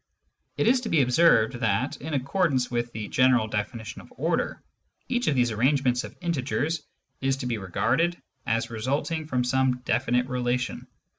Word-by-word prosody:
It - - +1
is 250 +3 +4
to 230 - -4
be 155 -4 +4
observed 125 -3 +4
that, 110 +3 0
in 155 +1 -4
accordance 135 -2 +1
with 120 0 -1
the 110 -2 -5
general 125 -2 +3
definition 110 +1 -4
of - - -18
order, - - -1 0.5
each 245 -1 -1
of 145 - +3
these 120 -2 +2
arrangements 125 +2 +2
of - - -10
integers 160 -1 -1 0.4
is 135 0 +1
to 135 - -5
be 120 -3 -1
regarded 165 - 0 0.3
as 115 +1 0
resulting 140 +7 -2
from 125 -4 0
some 125 0 +1
definite 125 +2 +1
relation. 125 -1 -2
125 Hz, 160 wpm, -26 LUFS, 120-150 Hz, 0.5 s, is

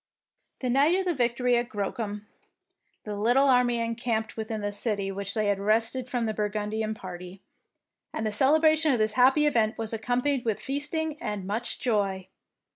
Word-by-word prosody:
The 255 - -1
night 285 +7 +4
of 380 0 0
the 355 - +1
victory 245 -2 +1
at 240 +1 -2
Grocum, 205 -1 -4 0.8
the 210 -1 -5
little 245 +7 +3
army 250 -2 +3
encamped 230 -1 -2
within 220 -1 -4
the 205 0 -2
city 205 -2 -2
which 200 0 -4
they 215 -1 +1
had 200 -1 +1
wrested 225 +5 0
from 245 -2 -1
the 220 - -1
Burgundian 215 +1 -2
party, 180 -1 -9 0.7
and 220 - -3
the 215 - 0
celebration 310 +6 +4
of - - +2
this 215 -1 +1
happy 265 +5 +4
event 230 -6 +2
was 225 0 -4
accompanied 245 +4 0
with 220 -3 -1
feasting 300 +2 -3
and 210 -3 -4
much 220 +5 -3
joy. 195 -5 -1
225 Hz, 170 wpm, -27 LUFS, 210-255 Hz, 0.8 s, night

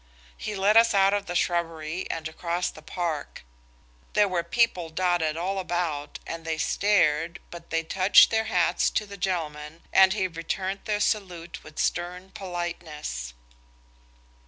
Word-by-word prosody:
He 210 - -5
led 200 +3 +4
us 230 -2 +6
out 195 0 +5
of 205 -1 -1
the 175 - -4
shrubbery 170 -1 -1
and 160 -1 -3
across 170 +2 -2
the 155 - -13
park. 165 -2 -4 0.7
There 210 -1 +4
were 180 -3 0
people 185 -5 +1
dotted 165 -2 0
all 190 +3 -1
about 175 -5 -2
and 165 0 -6
they 160 0 -2
stared, 170 -3 +2
but 170 -1 -10
they 165 0 0
touched 185 +4 +6
their 220 0 +1
hats 180 -6 +2
to 215 - -1
the 200 -1 -9
gentleman, 165 -4 -3
and 190 0 +7
he 195 -3 0
returned 185 +3 -4
their 210 -1 0
salute 180 -6 -2
with 155 - -14
stern 180 +2 -2
politeness. 170 - -5
175 Hz, 150 wpm, -26 LUFS, 165-195 Hz, 0.7 s, and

